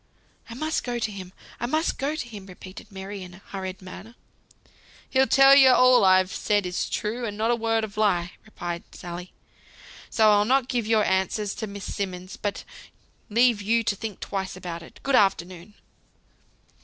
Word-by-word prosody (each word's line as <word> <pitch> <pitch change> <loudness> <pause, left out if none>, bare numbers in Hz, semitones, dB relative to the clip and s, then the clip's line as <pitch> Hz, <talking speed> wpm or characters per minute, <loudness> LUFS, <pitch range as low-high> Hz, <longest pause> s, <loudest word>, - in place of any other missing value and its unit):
"I 230 - -7
must 310 +5 -2
go 245 -1 -3
to 220 -2 -2
him, 190 -2 -8 0.3
I 240 - -2
must 315 +5 0
go 285 +3 -1
to 310 -6 -5
him," 205 -4 -10
repeated 185 +3 -12
Mary, 195 +1 -7
in 180 -1 -10
a 190 - -17
hurried 190 -1 -6
manner. 205 +5 -11 0.9
"He'll 265 0 +3
tell 270 +3 +7
you 270 -2 +8
all 255 -2 +6
I've 185 -1 +4
said 205 -2 0
is 180 0 -2
true, 230 +4 -3
and 210 -3 -4
not 225 +2 +1
a - - +3
word 225 -1 0
of 210 -1 -6
lie," 180 -5 +1
replied 175 -5 -6
Sally. 175 +1 -8 0.8
"So 220 -2 +4
I'll 205 0 +4
not 255 +3 +2
give 240 -4 -1
your 220 -1 +3
answer 190 +3 0
to 210 +2 -4
Miss 200 0 -7
Simmonds, 185 -2 -5
but 205 -1 -4 0.7
leave 235 0 +3
you 230 +3 +2
to 210 - 0
think 215 -1 -7
twice 190 -2 -4
about 175 -2 -6
it. 170 - -14
Good 275 -1 +2
afternoon!" 185 -2 +1
205 Hz, 180 wpm, -25 LUFS, 185-235 Hz, 0.9 s, you